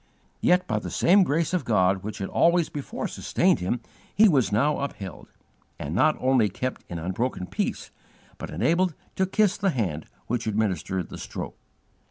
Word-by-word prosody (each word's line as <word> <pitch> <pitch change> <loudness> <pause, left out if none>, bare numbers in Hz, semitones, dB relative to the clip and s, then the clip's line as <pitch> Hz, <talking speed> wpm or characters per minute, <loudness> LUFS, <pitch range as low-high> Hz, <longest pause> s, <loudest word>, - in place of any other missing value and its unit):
Yet 180 +1 +3
by - - -1
the - - -6
same 195 +4 +4
grace 165 0 +1
of 180 - +1
God 95 -3 +2
which 105 +2 -6
had 95 - -3
always 170 -1 +3
before 145 -2 -4
sustained - - +1
him 95 +7 -2 0.3
he 220 +2 +7
was 135 - +3
now 145 +9 +2
upheld, 100 -9 -6 0.5
and 75 - -5
not 150 - +3
only 130 -5 +3
kept 125 +7 -4
in 85 - -4
unbroken 95 +5 -2
peace, - - -3 0.5
but - - -6
enabled 170 - +1 0.2
to 190 - +2
"kiss 205 0 +2
the 200 -1 +1
Hand 95 - -2 0.2
which 115 -1 -2
administered 95 -4 -1
the - - -8
stroke." - - -6
125 Hz, 170 wpm, -26 LUFS, -, 0.5 s, he